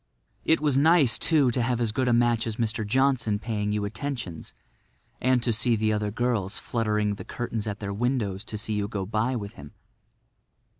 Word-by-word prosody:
It 160 Hz, -, +4 dB
was 150 Hz, -3 st, +1 dB
nice, 145 Hz, -3 st, +5 dB
too, 145 Hz, -6 st, +3 dB
to 120 Hz, -, 0 dB
have 120 Hz, 0 st, 0 dB
as 115 Hz, -3 st, +1 dB
good 130 Hz, +4 st, 0 dB
a -, -, +3 dB
match 120 Hz, -1 st, +2 dB
as 110 Hz, -, -2 dB
Mr. 115 Hz, 0 st, -1 dB
Johnson 120 Hz, -1 st, +1 dB
paying 105 Hz, -1 st, -2 dB
you 105 Hz, -1 st, -1 dB
attentions 110 Hz, -, -5 dB, 0.7 s
and 130 Hz, -2 st, +2 dB
to 120 Hz, -, +1 dB
see 115 Hz, +2 st, +2 dB
the 110 Hz, 0 st, +1 dB
other 105 Hz, 0 st, -1 dB
girls 110 Hz, -3 st, -1 dB
fluttering 105 Hz, -3 st, 0 dB
the 100 Hz, -, -7 dB
curtains 115 Hz, -3 st, -4 dB
at 105 Hz, 0 st, -4 dB
their 100 Hz, -1 st, -4 dB
windows 105 Hz, -4 st, -1 dB
to 105 Hz, -, -5 dB
see 110 Hz, +1 st, -2 dB
you 105 Hz, -1 st, -1 dB
go 100 Hz, -3 st, -4 dB
by 110 Hz, +5 st, 0 dB
with 100 Hz, -3 st, -5 dB
him. 75 Hz, 0 st, -12 dB
115 Hz, 195 wpm, -26 LUFS, 105-125 Hz, 0.7 s, nice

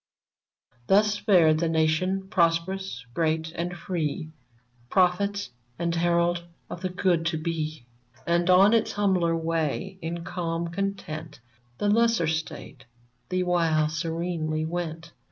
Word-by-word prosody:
Thus 210 Hz, +1 st, +4 dB
fared 175 Hz, -7 st, +4 dB
the 165 Hz, 0 st, +1 dB
Nation, 165 Hz, +4 st, +1 dB
prosperous, 170 Hz, -5 st, 0 dB
great, 160 Hz, +1 st, 0 dB
and 175 Hz, +1 st, -4 dB
free, 165 Hz, -2 st, -3 dB, 0.6 s
Prophet 195 Hz, -1 st, +1 dB, 0.3 s
and 170 Hz, 0 st, -1 dB
herald 170 Hz, 0 st, +1 dB, 0.3 s
of 170 Hz, -, -6 dB
the 185 Hz, -, -1 dB
good 180 Hz, -2 st, +1 dB
to 165 Hz, -, 0 dB
be; 155 Hz, -4 st, -3 dB, 0.4 s
And 170 Hz, +1 st, +1 dB
on 195 Hz, +4 st, +6 dB
its 230 Hz, -, +2 dB
humbler 185 Hz, -5 st, +2 dB
way, 165 Hz, +3 st, -2 dB
in 170 Hz, +1 st, -4 dB
calm 170 Hz, -1 st, -3 dB
content, 165 Hz, -5 st, -4 dB, 0.4 s
The 205 Hz, -, -1 dB
lesser 230 Hz, -3 st, +3 dB
State, 160 Hz, -4 st, -4 dB, 0.4 s
the 185 Hz, 0 st, 0 dB
while, 165 Hz, -4 st, +2 dB
serenely 160 Hz, 0 st, -2 dB
went. 165 Hz, -1 st, -4 dB
170 Hz, 120 wpm, -26 LUFS, 160-185 Hz, 0.6 s, on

